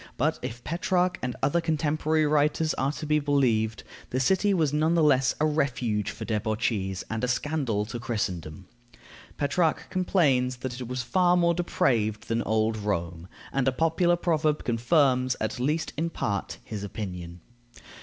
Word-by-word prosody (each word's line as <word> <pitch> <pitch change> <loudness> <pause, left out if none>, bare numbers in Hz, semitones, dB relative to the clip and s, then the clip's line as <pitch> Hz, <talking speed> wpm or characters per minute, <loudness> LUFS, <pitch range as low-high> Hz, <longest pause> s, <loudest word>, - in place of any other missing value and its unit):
But - - +1
if 120 +2 -6
Petrarch 180 +2 0
and 125 -1 -3
other 145 +5 +2
contemporary 155 -1 +1
writers 150 +1 +2
are 135 +2 0
to 155 - -6
be 150 0 +2
believed, 125 -7 +1 0.3
the 130 - -1
city 190 +9 +2
was 160 -7 +1
none 155 +3 +2
the 165 - +3
less 135 -3 +3
a 155 - +3
refuge 125 -9 0
for 110 - -6
debauchees, 105 -3 -1
and 110 +1 -4
a - - +2
scandal 125 -5 -1
to 115 +2 -6
Christendom. 95 -8 -4 0.7
Petrarch 155 +3 0
complains 145 -9 +2
that 130 0 -4
it 125 - -5
was 125 0 -3
far 180 +6 +3
more 170 -1 +3
depraved 120 - 0
than 115 0 +1
old 110 +1 +1
Rome, 85 -5 -3 0.3
and 135 -1 +1
a - - +4
popular 165 +5 +2
proverb 155 -3 0
confirms, 130 +1 +2
at 110 +3 -3
least 150 +6 -1
in 165 +3 -1
part, 100 -10 -3
his 105 -2 -6
opinion. 90 -4 -6
130 Hz, 160 wpm, -27 LUFS, 110-155 Hz, 0.7 s, a